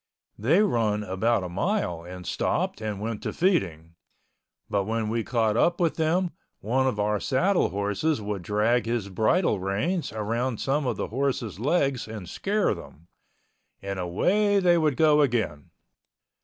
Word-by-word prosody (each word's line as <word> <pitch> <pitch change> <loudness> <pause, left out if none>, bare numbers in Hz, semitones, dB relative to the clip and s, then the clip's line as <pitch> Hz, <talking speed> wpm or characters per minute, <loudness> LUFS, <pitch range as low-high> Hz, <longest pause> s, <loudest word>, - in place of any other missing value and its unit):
They 155 - +3
run 110 - +1
about 105 +2 0
a - - -3
mile 95 - -1
and 90 +1 -9
stopped - - -1
and 105 -2 -3
went 110 0 -4
to - - -3
feeding—but 95 - -3
when 110 0 -1
we 115 0 -1
caught 110 -3 +1
up 170 +8 +2
with 170 -3 +1
them, 170 +3 +1 0.3
one 130 +5 +1
of 120 -5 -1
our 105 0 +1
saddle 175 - +2
horses 100 - -1
would 105 -2 -4
drag 110 +6 +1
his 115 -4 -1
bridle 110 - +2
reins 105 - -1
around 115 +3 -2
some 140 0 0
of 120 -4 -1
the - - -3
horses' 120 -5 -2
legs 135 -1 +1
and 110 -5 -7
scare 205 - 0
them—and 95 +3 -12
away 200 - +2
they 175 -2 +4
would 155 -5 +1
go 150 -2 +5
again. 115 - -1
115 Hz, 150 wpm, -26 LUFS, 100-150 Hz, 0.3 s, go